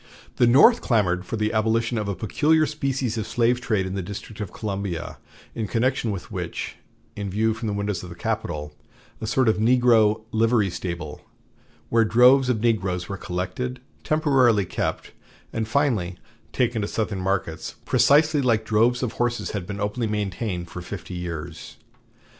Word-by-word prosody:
The 120 - +5
North 155 - +6
clamored 90 -6 +1
for - - -3
the 110 0 -1
abolition 110 +2 +1
of 105 - -3
a 100 - -2
peculiar 150 - +2
species 135 -6 -2
of 110 - -4
slave 120 +1 +1
trade 105 -6 0
in 95 - -4
the 95 - -2
District 100 +3 -8
of 100 - -5
Columbia, 100 -5 -4 0.3
in 110 -2 -3
connection 125 +1 0
with 100 -4 -5
which, - - -5 0.4
in 100 -1 -4
view 110 +3 +1
from 115 +1 -5
the 105 - -1
windows 100 -2 -2
of 90 - -9
the 85 - -9
Capitol, 85 -8 -3 0.5
a 110 - -3
sort 125 +2 +2
of 110 - +3
negro 115 -2 +4
livery 110 -3 +2
stable, 85 -4 -5 0.7
where 115 0 +4
droves 125 +4 +5
of 115 -4 0
negroes 95 -6 0
were 100 - -4
collected, 100 +8 -4 0.2
temporarily 130 -9 +3
kept, - - -3 0.4
and 110 -1 -2
finally 110 -9 0 0.3
taken 120 -3 0
to 105 - -1
Southern 105 -4 -2
markets, 95 -4 -2
precisely 150 +1 +4
like 115 -4 +1
droves 115 +4 +2
of 120 - -1
horses, 120 0 -1
had 95 -4 -4
been 100 -1 -5
openly 105 +3 -1
maintained 100 -3 -3
for 90 - -7
fifty 90 0 -7
years." 85 -2 -6
110 Hz, 165 wpm, -24 LUFS, 95-120 Hz, 0.7 s, North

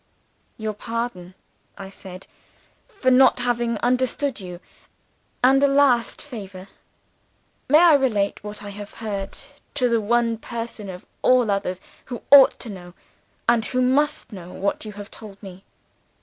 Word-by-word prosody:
"'Your 220 -1 -3
pardon,' 210 -5 -5 0.4
I 195 -1 -9
said, 190 -1 -10 0.6
'for 395 - 0
not 260 +1 +6
having 240 -2 0
understood 255 +2 +1
you 180 -2 -8 0.8
and 270 +2 +5
a - - +6
last 275 -4 +2
favor. 200 -8 -9 1.0
May 300 - +7
I 345 -2 +7
repeat 220 -10 +1
what 210 0 -8
I 205 - -7
have 205 0 -9
heard 200 -3 -5 0.4
to 255 -3 +2
the 230 -1 +2
one 230 +1 +1
person 230 -3 -6
of 180 -1 -9 0.2
all 250 -4 +4
others 185 -2 -2 0.3
who 245 -3 -7
ought 280 -2 +8
to 235 - -5
know, 175 -2 -11 0.5
and 235 -2 +4
who 255 - -1
must 280 +2 +1
know, 180 -2 -9
what 200 +3 -2
you 210 - -7
have 205 +1 -10
told 210 -3 -10
me? 190 -1 -11
230 Hz, 150 wpm, -23 LUFS, 200-255 Hz, 1.0 s, ought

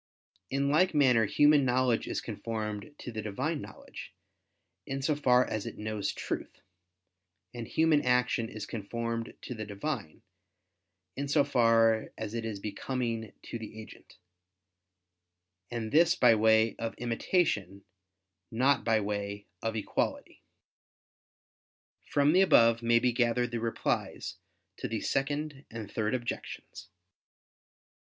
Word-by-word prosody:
In 140 +1 0
like 170 +3 +3
manner 125 -6 +5
human 145 +6 +5
knowledge 125 -2 +2
is - - -2
conformed 110 +4 -5
to 125 - -7
the 110 -1 -4
Divine 130 +9 -2
knowledge, - - -11 0.7
in 135 0 -3
so 150 +2 +2
far 125 -3 +4
as 110 -2 -4
it - - -7
knows 105 -1 -2
truth: - - -5 0.9
and 120 -2 -6
human 160 0 +3
action 125 -3 +1
is 105 -1 -6
conformed 115 +2 -4
to - - -5
the 110 -2 -5
Divine, 105 - -5 0.9
in 140 +1 -3
so 140 - +4
far 115 -4 +3
as 110 -1 -5
it 115 -1 -3
is 110 -3 -4
becoming 115 +1 -3
to 115 - -6
the 110 0 -8
agent: 110 - -13 1.5
and 115 -2 -4
this 170 +2 +5
by 120 -2 +6
way 110 0 +4
of 115 0 -4
imitation, 115 - 0 0.7
not 130 +4 +2
by 115 -1 +3
way 100 0 -3 0.2
of 115 0 -2
equality. 110 - -2 1.7
From 145 +2 +3
the 185 - +6
above 115 -10 +5
may 115 0 +4
be 125 +1 +2
gathered 120 0 +1
the 120 - -2
replies 115 0 -2 0.4
to - - -4
the - - -3
Second 145 +1 -2
and 110 -3 -7
Third 110 +2 0
Objections. 120 -2 -6
115 Hz, 130 wpm, -30 LUFS, 110-135 Hz, 1.7 s, by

